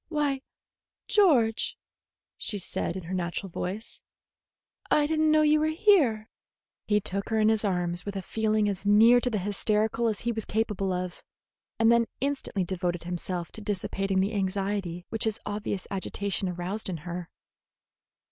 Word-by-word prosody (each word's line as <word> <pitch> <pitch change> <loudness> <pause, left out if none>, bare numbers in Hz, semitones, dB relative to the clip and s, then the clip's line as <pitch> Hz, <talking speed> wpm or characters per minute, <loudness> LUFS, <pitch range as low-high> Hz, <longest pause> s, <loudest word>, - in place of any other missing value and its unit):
"Why, 290 -4 0 0.7
George," 255 - +3 0.6
she 210 - -1
said, 175 -2 -3
in 185 - -6
her 170 +3 -6
natural 180 +1 -3
voice; 195 +7 -5 0.9
"I 295 - +4
did 310 +1 0
n't 315 - +4
know 310 0 +5
you 305 0 +4
were 310 - +2
here." 315 - +3 0.6
He 210 -1 +3
took 195 0 -3
her 220 -1 +1
in 215 0 +4
his 220 -1 +2
arms 180 -3 0
with 200 -1 -5
a 195 - -3
feeling 215 +1 +1
as 195 -2 -2
near 225 +4 +6
to 250 - 0
the 220 - -1
hysterical 210 +3 0
as 215 -2 -1
he 235 - 0
was 220 -1 -3
capable 205 -3 -1
of, 180 -1 -4 0.5
and 225 0 +5
then 235 0 +4
instantly 270 -8 -1
devoted 175 -1 -2
himself 175 0 -4
to 220 - -8
dissipating 195 -1 -1
the 200 +4 0
anxiety 195 -3 -2
which 225 0 -2
his 220 -1 -1
obvious 205 -2 -3
agitation 195 0 -2
aroused 180 +4 -4
in 175 - -3
her. 175 -1 -5
205 Hz, 165 wpm, -28 LUFS, 185-225 Hz, 0.9 s, near